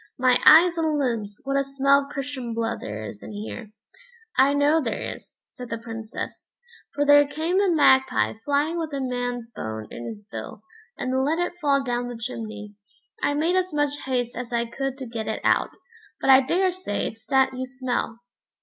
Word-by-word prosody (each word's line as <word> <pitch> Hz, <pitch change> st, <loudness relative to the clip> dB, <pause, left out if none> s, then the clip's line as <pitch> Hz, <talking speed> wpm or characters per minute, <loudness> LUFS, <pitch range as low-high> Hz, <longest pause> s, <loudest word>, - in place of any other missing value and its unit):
"My 255 Hz, -1 st, +4 dB
eyes 335 Hz, +2 st, +8 dB
and 315 Hz, -2 st, +1 dB
limbs, 225 Hz, -7 st, -2 dB
what 275 Hz, 0 st, 0 dB
a -, -, +1 dB
smell 275 Hz, 0 st, +3 dB
of 280 Hz, -, -6 dB
Christian 265 Hz, -4 st, -5 dB
blood 230 Hz, 0 st, -1 dB
there 105 Hz, +1 st, -6 dB
is 105 Hz, -1 st, -9 dB
in -, -, -9 dB
here," 215 Hz, +3 st, -6 dB
said -, -, -21 dB, 0.6 s
he. 265 Hz, +1 st, +5 dB
"I -, -, +1 dB
know 295 Hz, +3 st, +3 dB
there 235 Hz, -5 st, -2 dB
is," -, -, -7 dB, 0.2 s
said 250 Hz, -4 st, -9 dB
the 230 Hz, -, -2 dB
Princess, 225 Hz, -1 st, -7 dB, 0.5 s
"for 290 Hz, -, +1 dB
there 290 Hz, 0 st, +7 dB
came 330 Hz, +6 st, 0 dB
a 400 Hz, -, +3 dB
magpie 265 Hz, -5 st, +4 dB
flying 290 Hz, +4 st, +1 dB
with 320 Hz, -2 st, -3 dB
a 280 Hz, -, -2 dB
man's 245 Hz, -2 st, -3 dB
bone 110 Hz, -, -5 dB
in 120 Hz, -, -7 dB
his 210 Hz, -2 st, -8 dB
bill, 215 Hz, 0 st, -8 dB, 0.3 s
and 260 Hz, +1 st, 0 dB
let 305 Hz, +4 st, +1 dB
it 350 Hz, 0 st, -1 dB
fall 280 Hz, -2 st, +2 dB
down 245 Hz, -1 st, -2 dB
the 245 Hz, -1 st, -6 dB
chimney. 220 Hz, -3 st, -6 dB, 0.5 s
I 290 Hz, -, +1 dB
made 325 Hz, +5 st, +1 dB
as 370 Hz, -4 st, 0 dB
much 290 Hz, -1 st, +1 dB
haste 245 Hz, -2 st, -1 dB
as 245 Hz, 0 st, -6 dB
I 235 Hz, 0 st, 0 dB
could 270 Hz, +3 st, -4 dB
to 265 Hz, -, -6 dB
get 230 Hz, -2 st, -5 dB
it 220 Hz, -, -2 dB
out, -, -, +3 dB, 0.5 s
but 270 Hz, -, +4 dB
I 265 Hz, 0 st, +8 dB
daresay 365 Hz, -, 0 dB
it's 220 Hz, 0 st, -7 dB
that 265 Hz, -1 st, +3 dB
you 260 Hz, 0 st, -4 dB
smell." 255 Hz, -3 st, -3 dB
260 Hz, 200 wpm, -24 LUFS, 230-290 Hz, 0.6 s, eyes